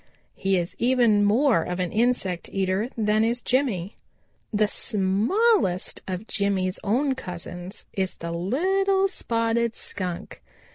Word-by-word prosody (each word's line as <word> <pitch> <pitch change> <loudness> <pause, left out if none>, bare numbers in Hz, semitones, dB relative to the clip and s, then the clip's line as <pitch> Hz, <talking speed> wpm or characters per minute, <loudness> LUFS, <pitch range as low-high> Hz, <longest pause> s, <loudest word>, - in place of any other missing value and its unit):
He 195 0 0
is 175 0 -3
even 235 -4 +4
more 225 - +4
of 180 +2 -4
an 180 -2 -1
insect 215 -6 0
eater 195 +4 0
than 215 0 +2
is 235 +2 0
Jimmy. 235 -8 0 0.5
"The 210 -1 +2
smallest 210 - +1
of 185 +2 -4
Jimmy's 195 -3 0
own 260 +7 +1
cousins 180 -5 -7
is 190 -1 -2
the 170 0 -5
Little 380 - +1
Spotted 230 - -1
Skunk. 180 -3 -5
210 Hz, 125 wpm, -25 LUFS, 185-245 Hz, 0.5 s, even